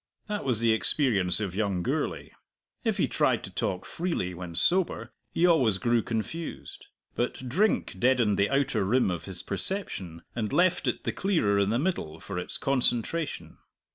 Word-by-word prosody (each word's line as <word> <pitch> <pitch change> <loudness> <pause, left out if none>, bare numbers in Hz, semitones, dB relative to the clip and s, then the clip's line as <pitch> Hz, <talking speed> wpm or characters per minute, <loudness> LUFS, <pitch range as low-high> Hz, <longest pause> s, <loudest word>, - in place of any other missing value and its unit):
That 210 -1 -3
was 125 -5 +1
the 115 -1 +4
experience 110 - +3
of 100 -4 -3
young 100 -3 -1
Gourlay. - - -2 0.5
If - - 0
he - - +2
tried - - +1
to - - -7
talk 90 -1 -2
freely 165 - -2
when 85 -1 -7
sober, 180 - +1 0.2
he 170 - +2
always 130 - +4
grew 120 +4 +2
confused. 115 +10 -5 0.3
But 125 +1 -3
drink 180 - +1
deadened 120 -5 +3
the 100 - +3
outer 135 -6 +1
rim 110 +1 +2
of 85 -1 -4
his 95 -3 -6
perception 95 - -2
and 110 -3 -2
left 180 0 +2
it - - -1
the - - -2
clearer 160 - +1
in 100 0 +2
the 115 - +1
middle 130 - -2
for 90 - -5
its 90 - -1
concentration. 135 +4 -1
115 Hz, 170 wpm, -28 LUFS, 95-160 Hz, 0.5 s, the